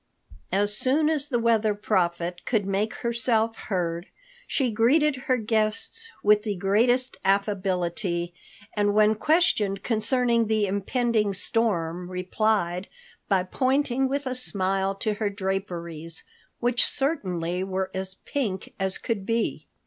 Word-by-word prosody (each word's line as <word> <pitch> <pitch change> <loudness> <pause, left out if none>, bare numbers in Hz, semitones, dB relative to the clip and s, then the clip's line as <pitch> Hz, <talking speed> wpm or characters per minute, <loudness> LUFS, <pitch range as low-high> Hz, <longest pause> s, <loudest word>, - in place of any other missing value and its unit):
As 205 +1 +4
soon 295 +7 +5
as 295 -2 0
the 245 - +1
Weather 225 -2 +2
Prophet 175 -4 -1
could 220 -5 0
make 195 +3 -1
herself 235 -1 0
heard, 175 -3 -3 0.4
she 260 -4 0
greeted 270 +7 +3
her 255 - +3
guests 220 - 0
with 210 0 +5
the 210 -2 -3
greatest 230 +7 +2
affability, 185 -3 -1 0.4
and 205 -1 +1
when 215 0 +5
questioned 215 - +1
concerning 235 0 +2
the 215 -1 +1
impending 210 +1 0
storm 180 -5 -1
replied 185 0 -1 0.4
by 190 -3 +3
pointing 265 +5 0
with 280 +1 -2
a 255 - -2
smile 195 -5 -1
to 210 +2 -1
her 205 0 -1
draperies, 175 -5 -4 0.4
which 240 0 +2
certainly 185 - -1
were 190 0 -3
as 190 0 -4
pink 215 -10 -3
as 190 0 -1
could 225 -5 -3
be. 230 +3 -2
210 Hz, 125 wpm, -25 LUFS, 190-235 Hz, 0.4 s, soon